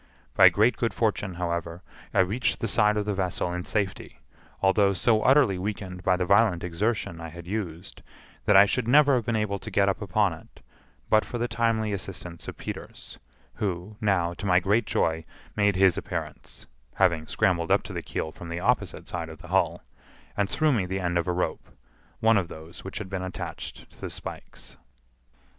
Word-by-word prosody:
By 95 +4 +8
great 105 +8 +2
good 115 - -1
fortune, 105 -4 0
however, 85 0 -3 0.3
I - - +4
reached 105 +7 0
the 115 - -1
side 105 0 +3
of 105 - -1
the 105 - -1
vessel 90 -2 -1
in 90 0 -4
safety, 100 - -3 0.4
although 100 +1 +3
so 110 +3 +2
utterly 130 -8 +4
weakened 95 -2 -4
by 90 0 +2
the 90 - 0
violent 100 -2 +3
exertion 90 -1 -2
I 80 - -6
had 85 +1 -10
used 95 -2 -5 0.4
that 105 - +4
I 100 - +9
should 115 +3 -1
never 145 +2 +6
have 120 -4 0
been 115 - +1
able 105 -2 -1
to - - -8
get 100 0 +2
upon 100 -1 +1
it 80 - -15 0.5
but 110 0 +4
for 120 - -5
the 120 +1 -1
timely 115 -2 0
assistance 90 -3 -6
of - - -7
Peters, - - -8 0.3
who, 95 +1 -4
now, 90 -5 +1
to 100 - -5
my 90 -1 +5
great 105 +5 +1
joy, 80 0 0 0.3
made 100 -2 +3
his 95 -1 +4
appearance - - -6 0.3
(having 85 -5 +2
scrambled 85 -3 +1
up - - +3
to - - -8
the - - -3
keel 80 - -4
from 85 +1 -10
the 85 +1 -3
opposite - - 0
side 85 -2 -4
of 80 - -9
the 85 +2 -13
hull), 90 -2 +1 0.5
and 100 -1 0
threw 155 -1 +2
me 100 -7 0
the 95 +1 -2
end 90 -1 -1
of 85 - -2
a - - +1
rope—one 90 - -2
of 90 - -3
those 80 +1 -11
which 95 - -6
had 110 - -5
been 95 -1 -4
attached 95 0 -6
to - - -21
the - - -4
spikes. - - -9
95 Hz, 190 wpm, -26 LUFS, 85-105 Hz, 0.5 s, I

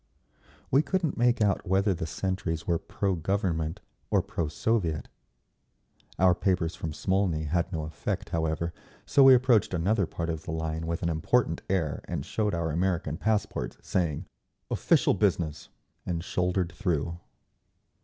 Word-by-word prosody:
We 135 - +6
couldn't 170 -2 -1
make 120 -1 +3
out 100 -1 +1
whether 95 +2 +3
the 80 -2 -4
sentries 90 -3 -2
were 85 -2 +1
pro 100 -1 -1
Government 85 -1 -1 0.3
or - - +3
pro 85 - -2
Soviet. 80 -1 -1 1.1
Our 90 -1 +5
papers 90 -2 0
from 80 - -4
Smolny 95 -1 0
had 85 +4 0
no 80 -4 -2
effect, 80 0 -4
however, 80 +1 -1 0.3
so 140 - +4
we 135 -1 +10
approached 120 -6 +3
another 95 +2 +1
part 85 +1 -3
of 80 -2 -4
the 80 - -5
line 80 0 -3
with 85 +1 -2
an 85 - +1
important 80 +3 +1
air 85 -6 0
and - - -4
showed 105 -4 -1
our 85 -1 -1
American 85 -2 0
passports, 105 +1 -1
saying 85 -6 -1 0.5
"Official - - +3
business!" 80 -4 0 0.3
and 85 -2 -3
shouldered 90 -1 0
through. 85 -4 -1
85 Hz, 145 wpm, -28 LUFS, 80-100 Hz, 1.1 s, we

